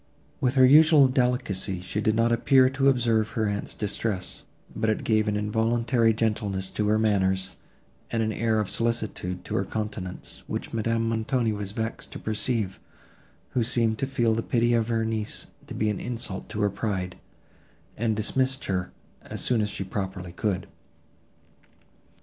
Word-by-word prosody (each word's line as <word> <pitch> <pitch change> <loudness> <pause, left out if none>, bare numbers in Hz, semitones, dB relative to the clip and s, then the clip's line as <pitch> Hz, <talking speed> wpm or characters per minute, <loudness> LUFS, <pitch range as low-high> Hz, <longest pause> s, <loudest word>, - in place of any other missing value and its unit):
With 125 +1 +1
her 130 -1 +7
usual 150 +1 +7
delicacy, 125 -8 0
she 90 +4 -3
did 110 0 +2
not 115 +1 +3
appear 130 +2 +4
to 135 0 +3
observe 115 -4 +2
her 110 -1 +2
aunt's 100 0 -3
distress, 105 -2 -3 0.3
but 110 0 0
it 110 - 0
gave 110 -1 +2
an 105 -1 +1
involuntary 115 +2 +2
gentleness 105 -4 -1
to 105 - -1
her 105 +1 +3
manners, 95 -3 +1 0.5
and 115 -1 0
an 110 0 -1
air 110 +1 +1
of 105 - 0
solicitude 110 -6 -2
to - - -6
her 95 - +1
countenance, 100 -3 -5
which - - -4
Madame 115 0 0
Montoni 115 +1 0
was 100 -1 -5
vexed 110 +2 -4
to - - -5
perceive, 110 -3 -1 0.7
who 125 - 0
seemed 115 -1 +1
to 135 - 0
feel 120 -4 +1
the 115 - 0
pity 120 +1 +1
of 115 -1 +2
her 115 -1 0
niece 110 -1 -3 0.2
to - - -7
be 110 0 +1
an 105 - -4
insult 115 -6 -5
to 105 - -3
her 105 -1 +2
pride, 95 -4 -3 0.8
and 110 0 0
dismissed 130 +5 0
her 90 -2 -2 0.3
as - - -5
soon 120 -3 +2
as 105 - 0
she 100 - -4
properly 95 -2 -4
could. 95 +1 -2
110 Hz, 165 wpm, -26 LUFS, 105-115 Hz, 0.8 s, her